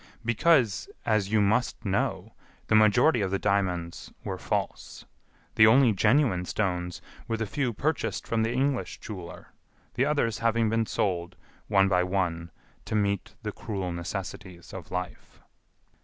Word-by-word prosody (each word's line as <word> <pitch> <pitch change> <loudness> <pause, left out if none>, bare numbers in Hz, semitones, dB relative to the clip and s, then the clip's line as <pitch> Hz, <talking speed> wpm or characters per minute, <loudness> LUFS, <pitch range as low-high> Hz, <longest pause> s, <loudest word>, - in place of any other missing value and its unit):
"Because, 120 - +2 0.2
as 110 -3 +1
you 110 -1 +4
must 110 +3 0
know, 100 0 -1 0.3
the - - -1
majority 110 +5 +5
of 95 - 0
the 95 - 0
diamonds 90 -4 -1
were - - -4
false. - - -4 0.5
The 110 - +7
only 125 +1 +6
genuine 105 -2 +3
stones 90 -3 -2 0.2
were 115 -1 -1
the 110 - -2
few 130 +3 -1
purchased 150 +8 -2
from 115 -1 0
the 115 +1 +1
English 130 +1 -1
jeweler, 90 -6 -9 0.4
the 125 +5 +1
others 140 -7 0
having 115 -1 +1
been 115 -1 +1
sold, 90 -2 -1 0.3
one 100 -2 +4
by 90 -2 +3
one, 90 -2 -1 0.4
to - - -3
meet 100 -2 -1
the - - -3
cruel 95 -4 -4
necessities 90 0 -6
of 90 -4 -8
life." 90 0 -6
105 Hz, 145 wpm, -27 LUFS, 90-115 Hz, 0.5 s, The